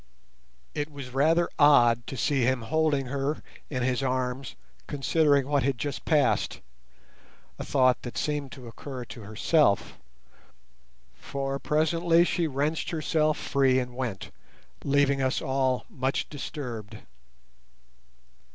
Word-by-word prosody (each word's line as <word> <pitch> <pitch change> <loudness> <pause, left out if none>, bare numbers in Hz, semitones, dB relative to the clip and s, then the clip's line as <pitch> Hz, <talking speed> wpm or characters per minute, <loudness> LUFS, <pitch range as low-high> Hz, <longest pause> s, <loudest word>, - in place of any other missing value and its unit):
It 145 +1 -3
was 140 -3 -8
rather 160 +6 +3
odd 120 -6 +5
to 135 - -6
see 130 +6 +1
him 125 0 +1
holding 150 0 +1
her 140 +3 -2 0.3
in 130 -4 -2
his 130 +1 0
arms 130 -1 -2 0.3
considering 145 -1 +2
what 145 -1 +2
had 135 -1 0
just 140 +3 -4
passed—a 65 - -3
thought 130 -2 +2
that 120 - -7
seemed 145 -3 -2
to 125 -3 -10
occur 125 +2 -7
to 115 - -10
herself, 110 +3 +1 1.1
for 135 0 -4
presently 165 +3 +3
she 175 -1 0
wrenched 150 +3 -1
herself 155 -1 +1
free 135 -2 +2
and 125 -1 -2
went, 120 -7 -4 0.5
leaving 140 -1 +2
us 130 0 +1
all 130 -1 0
much 130 +1 -2
disturbed. 120 -7 -6
135 Hz, 120 wpm, -27 LUFS, 125-150 Hz, 1.1 s, odd